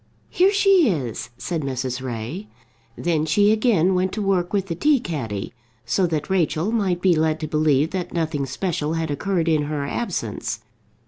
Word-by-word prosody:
"Here 375 +2 +4
she 390 - +4
is," 130 - -3
said 170 -3 -3
Mrs. 130 -2 -3
Ray. 130 - -5 0.5
Then 165 -3 0
she 205 +6 +4
again 215 -5 +3
went 185 0 +1
to 215 - -2
work 185 -3 +1
with 200 -2 0
the 180 - -3
tea 290 - +3
caddy, 115 - -4 0.3
so 190 -2 +1
that 155 -3 -2
Rachel 185 0 +1
might 190 -6 0
be 185 -3 +5
led 155 0 +1
to 155 - -2
believe 150 0 +2
that 185 -2 -3
nothing 155 -4 -1
special 155 +2 -2
had 165 -2 -2
occurred 170 +3 -1
in 155 -2 +2
her 145 -1 -2
absence. 235 +11 -3
165 Hz, 175 wpm, -22 LUFS, 150-195 Hz, 0.5 s, be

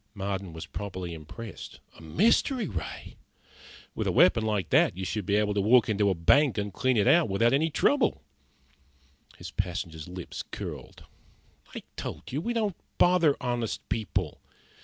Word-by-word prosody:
Marden 95 -2 -4
was 80 0 -7
properly 95 -4 -6
impressed. 85 +8 -9 0.2
"A - - -15
mystery 220 - +2
ray! 85 - -6 0.8
With - - -3
a - - +2
weapon 110 +5 +5
like 105 -7 -1
that, - - +4
you 95 - -3
should 100 +1 -3
be 100 - +2
able 105 0 +2
to 100 - +1
walk 115 +3 +4
into 100 -1 +2
a 95 - +1
bank 115 - +3
and 100 -1 -3
clean 130 +2 +1
it 105 - +3
out 170 -7 +5
without 115 +5 +2
any 155 +4 +2
trouble." 235 - +1 1.1
His - - -8
passenger's 85 -4 -4
lips 90 -1 -7
curled. - - -8 0.7
"I - - -6
told - - -6
you, 140 +4 -2
we 235 - -2
don't 215 -5 -1 0.2
bother 175 -5 +4
honest 120 -2 -3
people. 95 -7 -2
105 Hz, 160 wpm, -28 LUFS, 90-135 Hz, 1.1 s, weapon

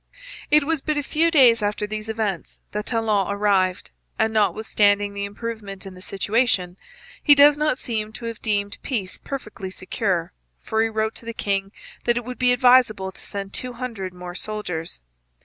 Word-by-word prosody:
It 300 0 +5
was 320 0 0
but 305 +1 -1
a 290 - 0
few 320 +4 +2
days 250 -8 +6
after 210 0 -1
these 215 +1 -5
events 215 -6 -3
that 210 0 -4
Talon 220 -4 +1
arrived, 200 -2 +1 0.3
and, 220 0 +1
notwithstanding 205 -1 +2
the 200 0 -3
improvement 205 -2 -6
in 190 - -8
the 185 - -13
situation, 195 -2 0 0.5
he 290 - +7
does 290 +1 +7
not 300 -3 +1
seem 220 -4 -3
to 235 - -8
have 230 -1 -5
deemed 205 -1 -1
peace 200 -8 -3
perfectly 215 -8 -6
secure, 185 -2 -2 0.3
for 220 0 -1
he 225 - +2
wrote 220 0 -1
to - - -10
the 230 - -5
king 195 -1 -1 0.3
that 240 0 +3
it 240 - -3
would 250 0 -7
be 250 -1 +4
advisable 245 -6 +4
to - - -13
send 195 -1 -6
two 250 -1 -3
hundred 230 -7 -5
more 180 0 -8
soldiers. 180 - -4
215 Hz, 180 wpm, -23 LUFS, 195-240 Hz, 0.5 s, he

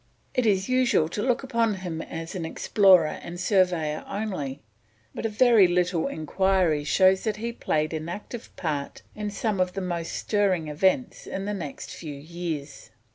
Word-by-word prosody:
It 250 -3 +1
is 195 -2 +2
usual 255 -11 +3
to 205 - -3
look 250 +3 +1
upon 230 -5 +1
him 175 -4 -5
as 165 0 -6
an 180 -4 -4
explorer 180 0 +4
and 175 0 -7
surveyor 180 -6 +1
only, 185 -10 -3 0.5
but 225 - -2
a 220 -2 +5
little 175 -1 +1
enquiry 175 -1 +1
shows 185 +5 +4
that 215 -2 0
he 230 +2 -3
played 155 -8 -1
an 160 +1 -4
active 210 +5 -7
part 150 -5 -3
in 210 0 -4
some 205 0 -2
of 180 0 +1
the 195 - -3
most 170 -2 -3
stirring 190 -7 0
events 190 - 0
of 195 +1 -4
the 210 - -2
next 160 -8 -6
few 150 -4 -7
years. 155 -1 -6
185 Hz, 165 wpm, -26 LUFS, 160-210 Hz, 0.5 s, a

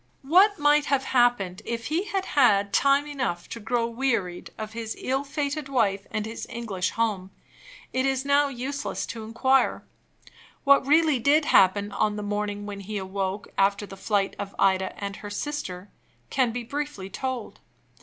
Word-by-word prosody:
What 380 +8 +5
might 295 0 +4
have 275 -2 +1
happened 240 -9 +2
if 230 -1 -4
he 330 +6 -1
had 390 -2 -2
had 205 -8 +3
time 280 +1 +4
enough 260 -12 -3
to 230 - -6
grow 230 +1 0
wearied 230 -7 -2
of 215 0 -6
his 225 -1 -4
ill 265 +2 -1
fated 285 0 -3
wife 205 -7 +1
and 215 -1 -2
his 225 +1 -6
English 210 -6 -2
home, 210 -5 -1 0.6
it 260 - +1
is 265 0 0
now 285 +1 +4
useless 275 +2 -4
to 225 -1 -7
inquire. 260 +4 +1 0.8
What 280 -1 +5
really 305 -2 +4
did 290 +5 +3
happen 200 -1 +4
on 210 +1 0
the 210 - -4
morning 205 0 -3
when 205 -1 -6
he 205 +2 -5
awoke 195 +1 -3
after 200 +1 +2
the 195 - -10
flight 195 0 0
of 200 0 -6
Ida 190 -1 +2
and 200 0 -5
her 205 - -8
sister 205 -6 -5 0.4
can 255 -4 +2
be 245 +1 -4
briefly 280 -6 -4
told. 260 +1 -4
230 Hz, 165 wpm, -26 LUFS, 200-275 Hz, 0.8 s, What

